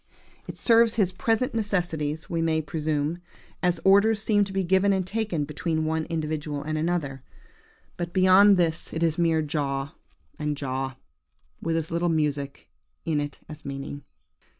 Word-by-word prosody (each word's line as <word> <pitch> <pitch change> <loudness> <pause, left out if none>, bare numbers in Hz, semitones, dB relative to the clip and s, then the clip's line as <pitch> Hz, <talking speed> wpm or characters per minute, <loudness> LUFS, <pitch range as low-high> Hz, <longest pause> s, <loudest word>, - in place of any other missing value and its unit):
It - - -7
serves 230 -1 +4
his 200 -5 +2
present 225 +6 0
necessities, 170 -8 -2
we 165 -1 -1
may 160 -1 +1
presume, 155 +1 -2 0.4
as 180 -1 +1
orders 200 +3 +5
seem 210 -1 +2
to 195 - -8
be 195 0 0
given 190 +3 +3
and 190 -1 0
taken 200 -7 -2
between 155 +2 -2
one 160 0 -1
individual 155 -3 -3
and 155 +1 -3
another; 155 -4 -1 0.8
but 175 -1 -4
beyond 190 +2 +6
this 165 -2 0
it 160 - -1
is 165 0 +1
mere 165 -2 +2
jaw, 140 -1 -2 0.5
and 150 -1 -2
jaw, 135 -1 -3 0.7
with 165 0 0
as 160 0 -3
little 170 +1 +1
music 145 -3 -1 0.4
in 155 -2 +1
it 145 -1 -5
as 155 -1 -10
meaning. 140 0 -6
165 Hz, 155 wpm, -26 LUFS, 150-185 Hz, 0.8 s, beyond